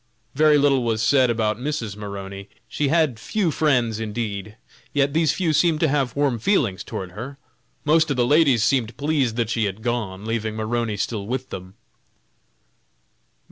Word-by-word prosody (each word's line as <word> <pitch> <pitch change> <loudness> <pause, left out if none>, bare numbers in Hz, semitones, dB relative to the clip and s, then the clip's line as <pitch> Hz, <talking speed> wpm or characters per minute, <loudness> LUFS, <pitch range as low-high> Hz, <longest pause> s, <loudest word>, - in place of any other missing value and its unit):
Very 150 +1 +5
little 140 -2 +3
was 115 -2 0
said 125 +1 +4
about 110 -2 0
Mrs. 125 -7 -3
Maroney. 100 -1 -7 0.2
She 145 - -1
had 150 -6 +2
few 190 - 0
friends, 125 -8 +1
indeed, 105 -2 -4 0.4
yet 140 -1 +2
these 160 -1 +3
few 170 -4 0
seemed 160 0 +3
to 160 - +4
have 140 -3 0
warm 140 -5 +1
feelings 115 - +1
towards 95 -2 -6
her; 125 +8 -7 0.5
most 160 +1 +4
of 140 - -1
the 120 - +3
ladies 140 -5 +4
seemed 115 -4 +1
pleased 145 -6 0
that 115 -2 -1
she 115 -2 +1
had 100 +2 -4
gone, 110 -5 -3
leaving 110 -1 -2
Maroney 110 0 -2
still 100 0 -3
with 130 +2 -4
them. 95 +1 -8
120 Hz, 165 wpm, -23 LUFS, 110-145 Hz, 0.5 s, Very